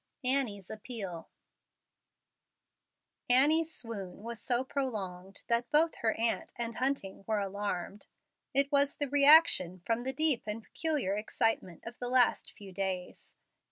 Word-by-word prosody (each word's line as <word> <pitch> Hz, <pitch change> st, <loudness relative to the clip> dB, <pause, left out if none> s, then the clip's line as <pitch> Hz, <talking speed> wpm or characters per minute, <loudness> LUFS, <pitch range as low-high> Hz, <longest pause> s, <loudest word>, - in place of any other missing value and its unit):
ANNIE'S 250 Hz, -7 st, -1 dB
APPEAL 210 Hz, -6 st, -7 dB, 2.0 s
Annie's 305 Hz, +6 st, +4 dB
swoon 205 Hz, -, -6 dB
was 230 Hz, -1 st, -5 dB
so 245 Hz, 0 st, +1 dB
prolonged 195 Hz, -9 st, -5 dB
that 235 Hz, +1 st, +1 dB
both 320 Hz, +2 st, +3 dB
her 220 Hz, -1 st, 0 dB
aunt 230 Hz, 0 st, -1 dB
and 235 Hz, -1 st, -4 dB
Hunting 255 Hz, -7 st, -2 dB
were 220 Hz, -1 st, 0 dB
alarmed. 200 Hz, -1 st, -4 dB, 0.4 s
It 275 Hz, +1 st, +3 dB
was 280 Hz, 0 st, +2 dB
the 290 Hz, -, -1 dB
reaction 280 Hz, -, +5 dB
from 230 Hz, +1 st, 0 dB
the 260 Hz, +2 st, -2 dB
deep 285 Hz, -4 st, 0 dB
and 215 Hz, +2 st, -4 dB
peculiar 290 Hz, -, -2 dB
excitement 210 Hz, -4 st, -1 dB
of 235 Hz, +1 st, -9 dB
the 245 Hz, -, -3 dB
last 250 Hz, -1 st, +2 dB
few 200 Hz, -2 st, -12 dB
days. 185 Hz, -1 st, -4 dB
230 Hz, 130 wpm, -31 LUFS, 200-270 Hz, 2.0 s, reaction